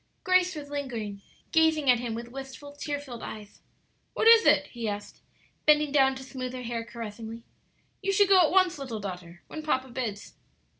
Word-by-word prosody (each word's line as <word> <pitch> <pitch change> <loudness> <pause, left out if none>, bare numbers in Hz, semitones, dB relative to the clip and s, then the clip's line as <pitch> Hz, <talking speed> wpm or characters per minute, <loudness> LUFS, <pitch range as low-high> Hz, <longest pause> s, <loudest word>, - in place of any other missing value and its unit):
Grace 370 -2 +3
was 290 -1 -8
lingering, 230 -8 -4 0.3
gazing 320 -3 +3
at 250 -2 +5
him 235 -2 -3
with 235 +1 -7
wistful, 270 +2 -9
tear 290 0 -4
filled 255 -5 -9
eves. 210 -1 -9 0.5
"What - - +2
is 455 0 +8
it?" - - +5
he 235 -3 -3
asked, 205 0 -7 0.5
bending 300 -1 +5
down 270 -2 +4
to 265 - -8
smooth 255 -1 -6
her 255 -1 -6
hair 235 -1 -3
caressingly. 230 0 -8 0.6
"You 395 0 0
should 400 +1 +4
go 380 -2 +7
at 320 - +4
once, 365 -3 +3
little 250 -6 -5
daughter, 180 -3 -8
when 310 - -7
papa 265 -4 -1
bids." 235 -5 -5
265 Hz, 185 wpm, -28 LUFS, 230-300 Hz, 0.6 s, is